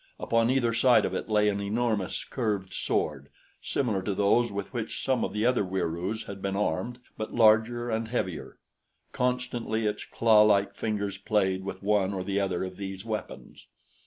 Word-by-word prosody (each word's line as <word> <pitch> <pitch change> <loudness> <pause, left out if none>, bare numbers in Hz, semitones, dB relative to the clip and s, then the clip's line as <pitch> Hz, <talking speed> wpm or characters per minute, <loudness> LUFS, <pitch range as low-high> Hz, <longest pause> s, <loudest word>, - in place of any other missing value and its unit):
Upon 115 0 +2
either 125 -3 +2
side 120 +2 +4
of - - -2
it - - -4
lay 105 -1 +3
an 100 -1 0
enormous, 105 -1 -1
curved 105 -7 -2
sword, 70 -5 -2 0.3
similar 110 -8 -1
to 100 +1 -2
those 105 +4 +3
with 100 +3 -5
which 115 -3 -4
some 130 -1 +1
of - - -2
the 105 +2 -1
other 125 -3 +3
Wieroos 95 +3 -2
had 100 -1 -8
been 95 0 -2
armed, 100 +4 -1 0.2
but 110 - -4
larger 115 +2 +4
and 110 0 -1
heavier. 95 -8 -3 0.5
Constantly 125 -3 -1
its 105 0 -1
clawlike 105 -3 +4
fingers 100 -2 -3
played 95 -3 +1
with 95 0 -6
one 100 -1 +2
or 95 - -3
the 100 +1 -1
other 95 -3 -1
of 95 -1 -6
these 95 0 -6
weapons. 110 -2 -6
105 Hz, 170 wpm, -28 LUFS, 95-115 Hz, 0.5 s, side